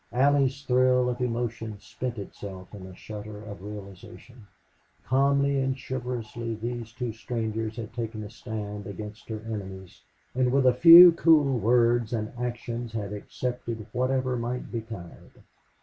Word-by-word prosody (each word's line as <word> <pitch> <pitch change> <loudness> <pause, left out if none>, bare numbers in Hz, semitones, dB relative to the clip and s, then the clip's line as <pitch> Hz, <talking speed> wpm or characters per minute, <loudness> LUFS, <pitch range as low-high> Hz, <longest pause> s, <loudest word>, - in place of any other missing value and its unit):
Allie's 140 +1 +2
thrill 125 -1 +3
of 125 0 -3
emotion 115 -3 -3
spent 125 +3 -5
itself 95 -1 -9
in 95 -2 -9
a 95 - -11
shudder 105 0 -8
of 100 -3 -9
realization. 105 +3 -11 0.6
Calmly 140 +1 +2
and 135 0 -1
chivalrously 120 -3 -4
these 115 0 -5
two 120 0 -4
strangers 110 -1 -3
had 115 -2 -7
taken 115 -2 -4
a 105 - -8
stand 105 -3 -6
against 105 +2 -8
her 110 -1 -4
enemies 95 -4 -7 0.3
and 125 0 +1
with 135 0 +3
a 125 - +6
few 170 +6 +11
cool 155 -5 +4
words 120 0 +3
and 110 -1 -3
actions 120 -1 -4
had 105 -2 -4
accepted 115 +1 -5
whatever 130 0 0
might 120 +1 -4
betide. 110 -7 -8
115 Hz, 140 wpm, -27 LUFS, 105-125 Hz, 0.6 s, few